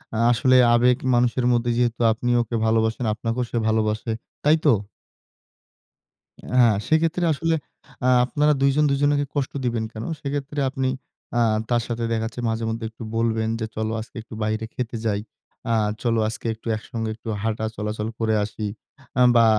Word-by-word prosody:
আ - - -1
আসলে 130 +2 +3 0.2
আবেগ 125 +1 +4 0.2
মানুষের 120 +1 +2
মধ্যে 120 0 +1
যেহেতু 120 -1 +1
আপনি 120 +2 -2
ওকে 115 0 -3
ভালোবাসেন, 110 +2 +1
আপনাকেও 115 +3 -2
সে - - -1
ভালবাসে। 110 +1 0 0.3
তাই 150 +2 +5
তো? 145 - +7 1.9
হ্যাঁ, 115 -4 +6
সেক্ষেত্রে 165 +2 +2
আসলে 165 +2 0 0.5
আ - - +4 0.2
আপনারা 150 +4 +2
দুজন 140 +2 +4
দুজনাকে 145 +1 +2
কষ্ট 140 -2 -1
দিবেন 115 -2 0
কেন? 110 0 -6 0.2
সেক্ষেত্রে 145 0 -3
আপনি 130 -1 -1 0.5
আ - - +4 0.3
তার 120 -1 +2
সাথে 120 0 -2
দেখাচ্ছে 115 +2 -2
মাঝে 115 0 -1
মধ্যে 115 0 -3
একটু 110 - -12
বলবেন 110 -1 +1
যে, 110 - -1
চলো 110 0 -1
আজকে 110 - -11
একটু 110 - -11
বাইরে 110 +1 -1
খেতে 120 -2 -3
যাই। 105 -2 +1 0.5
আ - - +4 0.3
চলো 115 -2 +2
আজকে 110 +1 -6
একটু 110 - -22
একসঙ্গে 110 +1 -5
একটু 115 +1 -11
হাঁটা 110 0 -1
চলাচল 105 +1 -3
করে 110 -1 +1
আসি। 105 +1 -5 0.5
আ - - +4 0.2
বা 115 - +7
115 Hz, 160 wpm, -23 LUFS, 110-130 Hz, 1.9 s, তো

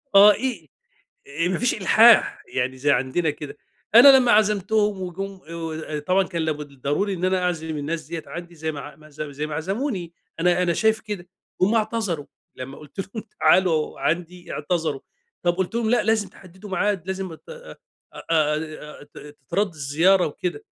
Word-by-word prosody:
آه 205 +1 +10
إي 260 +2 -4 0.6
إي 145 +4 -2
آآ، - - +2
ما 185 - -1
فيش 245 - +1
إلحاح، 220 +3 +5
يعني 130 0 -1
زي 145 +2 +1
عندنا 135 +6 +1
كده، 145 0 -8 0.4
أنا 265 +3 +10
لمّا 245 -2 +4
عزمتهم 210 -1 +2
وجُم 190 +2 -6
آآ 165 - -8
ود 165 -1 -5
آآ، 150 -1 -4
طبعًا 185 +6 +2
كان 170 -3 -2
لابد 150 -2 -3
الضروري 145 +9 -2
إن 180 0 -4
أنا 185 0 +1
أعزم 160 -3 -2
الناس 155 +2 -4
دِيّة 165 0 -5
عندي 175 0 -8
زي 160 0 -4
ما 145 - -7
ع 145 +2 -10
ما 155 0 -17
زو 150 0 -6
زي 145 +2 -4
ما 155 - -6
عزموني، 190 - -3 0.3
أنا 180 +1 +3
أنا 175 -1 +2
شايف 220 +4 +2
كده، 200 -5 -7 0.3
هُم 200 +5 +3
اعتذروا 215 -9 -1 0.3
لمّا 130 +2 -8
قُلت 150 +5 -16
لهم: 210 +3 -7 0.2
"تعالوا 165 -5 +3
عندي." 175 +1 -2
إعتذروا، 155 -2 -2 0.4
طب 175 0 +2
قُلت 190 +3 -2
لهم: 230 -2 0
"لأ، 240 -2 +3
لازم 220 -2 +1
تحددوا 190 +2 -14
معاد، 190 -1 0
لازم 190 -2 -4
أتاه 485 - -12
أ - - -15 0.4
أ - - -7
آآ، 155 -1 -1
ت - - -9
تترد 150 +7 -3
الزيارة 160 +6 +3
وكده." 180 - -4
175 Hz, 185 wpm, -23 LUFS, 155-200 Hz, 0.6 s, آه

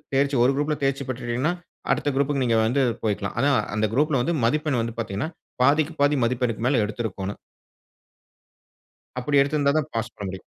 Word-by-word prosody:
தேர்ச்சி 140 0 +2
ஒரு 130 - +4
குரூப்ல 150 +1 0
தேர்ச்சி 135 0 0
பெற்றுட்டீங்கனா, 130 +5 -1 0.4
அடுத்த 145 - +1
குரூப்க்கு 140 -1 +1
நீங்க 115 -1 +2
வந்து 130 +4 +2 0.2
போயிக்கலாம். 100 -1 -1
ஆனா, 140 +3 +3 0.3
அந்த 110 +1 +2
குரூப்ல 145 -1 +2
வந்து 170 +4 0
மதிப்பெண் 150 -1 +1
வந்து 115 +1 -4
பாத்தீங்கனா, 105 +6 -2 0.3
பாதிக்கு 150 +4 +3
பாதி 145 +1 +4
மதிப்பெண்ணுக்கு 120 -2 -1
மேல 125 -4 +3
எடுத்திருக்கணும். 105 -2 -4 1.8
அப்படி 140 +3 +2
எடுத்திருந்தாதான், 145 +1 +1
பாஸ் 115 0 -3
பண்ண 100 - -6
முடியும். 95 -1 -6
135 Hz, 155 wpm, -24 LUFS, 115-145 Hz, 1.8 s, ஒரு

